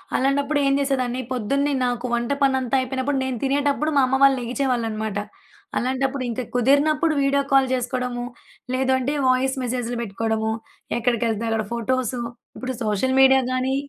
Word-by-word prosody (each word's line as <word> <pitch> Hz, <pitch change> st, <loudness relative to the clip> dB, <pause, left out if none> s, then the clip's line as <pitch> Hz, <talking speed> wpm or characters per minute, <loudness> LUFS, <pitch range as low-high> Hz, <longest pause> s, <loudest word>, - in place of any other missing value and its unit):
అలాంటప్పుడేం 280 Hz, +1 st, +2 dB
చేసేదాన్ని 260 Hz, -3 st, 0 dB
పొద్దున్నే 275 Hz, +4 st, 0 dB
నాకు 245 Hz, 0 st, -2 dB
వంట 235 Hz, +2 st, 0 dB
పనంతా 265 Hz, -1 st, +2 dB
అయిపోయినప్పుడు, 265 Hz, +2 st, -2 dB
నేను 260 Hz, -2 st, -2 dB
తినేటప్పుడు 285 Hz, +2 st, +1 dB
మా -, -, +6 dB
అమ్మ 265 Hz, +1 st, +1 dB
వాళ్ళు 275 Hz, -1 st, +6 dB
లెగిచేవాళ్ళనమాట. 230 Hz, -4 st, -2 dB, 0.6 s
అలాంటప్పుడు 265 Hz, +1 st, -1 dB
ఇంక 235 Hz, +2 st, -3 dB
కుదిరినప్పుడు 290 Hz, +6 st, +3 dB
వీడియో 280 Hz, 0 st, +2 dB
కాల్ 270 Hz, -1 st, +5 dB
చేసుకోడము. 250 Hz, -1 st, -2 dB, 0.5 s
లేదంటే, 260 Hz, +2 st, +1 dB
వాయిస్ 260 Hz, +1 st, +2 dB
మెసేజ్‌లు 245 Hz, -1 st, -2 dB
బెట్టుకోవడము, 220 Hz, +1 st, -1 dB, 0.5 s
ఎక్కడికెళ్తే 230 Hz, -2 st, 0 dB
అక్కడ 225 Hz, -1 st, 0 dB
ఫోటోసు. 245 Hz, +1 st, -1 dB, 0.4 s
ఇప్పుడు 260 Hz, 0 st, -4 dB
సోషల్ 220 Hz, +5 st, 0 dB
మీడియా 265 Hz, 0 st, +6 dB
గానీ 255 Hz, +1 st, 0 dB
255 Hz, 130 wpm, -23 LUFS, 240-275 Hz, 0.6 s, మా